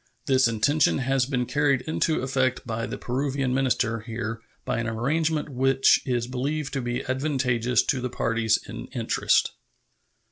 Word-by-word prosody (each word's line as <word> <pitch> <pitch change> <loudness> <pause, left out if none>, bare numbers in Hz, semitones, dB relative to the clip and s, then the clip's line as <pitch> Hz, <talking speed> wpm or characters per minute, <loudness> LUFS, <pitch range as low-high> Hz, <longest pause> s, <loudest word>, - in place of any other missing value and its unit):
This 130 -2 +4
intention 140 +7 +2
has 135 -1 +1
been 125 -3 -1
carried 140 -1 +1
into 155 0 0
effect 130 -1 0
by 115 0 -3
the - - -5
Peruvian 135 +1 -1
minister 120 -3 +1
here 115 0 -5 0.2
by - - -1
an 115 - -2
arrangement 150 +7 0
which 135 0 +3
is 120 -2 0
believed 135 +4 -3
to 135 - -1
be 120 +2 -3
advantageous 125 -3 +1
to 130 -3 -1
the 125 - -2
parties 115 -2 +1
in - - -7
interest. - - +2
130 Hz, 150 wpm, -25 LUFS, 120-135 Hz, 0.2 s, This